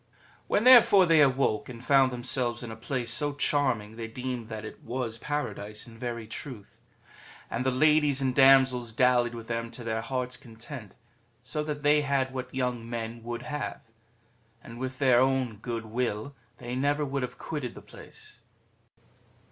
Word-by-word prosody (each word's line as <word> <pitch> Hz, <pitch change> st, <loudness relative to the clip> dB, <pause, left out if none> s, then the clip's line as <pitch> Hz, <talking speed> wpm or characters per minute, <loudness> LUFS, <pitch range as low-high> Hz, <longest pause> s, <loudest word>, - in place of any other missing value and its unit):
When 205 Hz, -, +2 dB
therefore 235 Hz, -6 st, +8 dB
they 165 Hz, -3 st, +5 dB
awoke, 135 Hz, -2 st, +2 dB
and 120 Hz, 0 st, -10 dB
found 135 Hz, -2 st, +5 dB
themselves 120 Hz, -1 st, -1 dB
in 115 Hz, -, -6 dB
a -, -, -7 dB
place 120 Hz, +1 st, -3 dB
so 145 Hz, +2 st, +1 dB
charming, 125 Hz, -7 st, 0 dB
they 115 Hz, -1 st, -5 dB
deemed 125 Hz, 0 st, -5 dB
that 110 Hz, -1 st, -6 dB
it -, -, -10 dB
was 115 Hz, -1 st, -4 dB
Paradise 110 Hz, -7 st, -4 dB
in 115 Hz, -2 st, -14 dB
very 120 Hz, -2 st, -4 dB
truth. 110 Hz, -1 st, -9 dB, 0.7 s
And 120 Hz, -, -1 dB
the 130 Hz, -, +2 dB
ladies 150 Hz, +1 st, +3 dB
and 130 Hz, -2 st, 0 dB
damsels 130 Hz, -3 st, +5 dB
dallied 120 Hz, -1 st, +3 dB
with 115 Hz, -1 st, -8 dB
them 115 Hz, 0 st, -3 dB
to 120 Hz, +1 st, -9 dB
their 110 Hz, -1 st, -2 dB
hearts' 125 Hz, +1 st, -3 dB
content, 115 Hz, -1 st, -10 dB, 0.5 s
so 150 Hz, +5 st, -3 dB
that 150 Hz, -1 st, -4 dB
they 150 Hz, +1 st, +4 dB
had 135 Hz, -2 st, 0 dB
what 130 Hz, -1 st, -5 dB
young 125 Hz, -3 st, -2 dB
men 115 Hz, 0 st, -5 dB
would 120 Hz, +1 st, -5 dB
have; 150 Hz, -6 st, -5 dB, 0.7 s
and 115 Hz, 0 st, -10 dB
with 130 Hz, 0 st, -4 dB
their 130 Hz, -3 st, +4 dB
own 130 Hz, -4 st, +1 dB
good 115 Hz, +1 st, -5 dB
will 115 Hz, +3 st, -3 dB, 0.2 s
they 125 Hz, 0 st, -6 dB
never 145 Hz, +3 st, +1 dB
would 140 Hz, 0 st, -2 dB
have 125 Hz, -, -5 dB
quitted 145 Hz, -6 st, -5 dB
the -, -, -10 dB
place. -, -, -14 dB
125 Hz, 170 wpm, -28 LUFS, 115-140 Hz, 0.7 s, therefore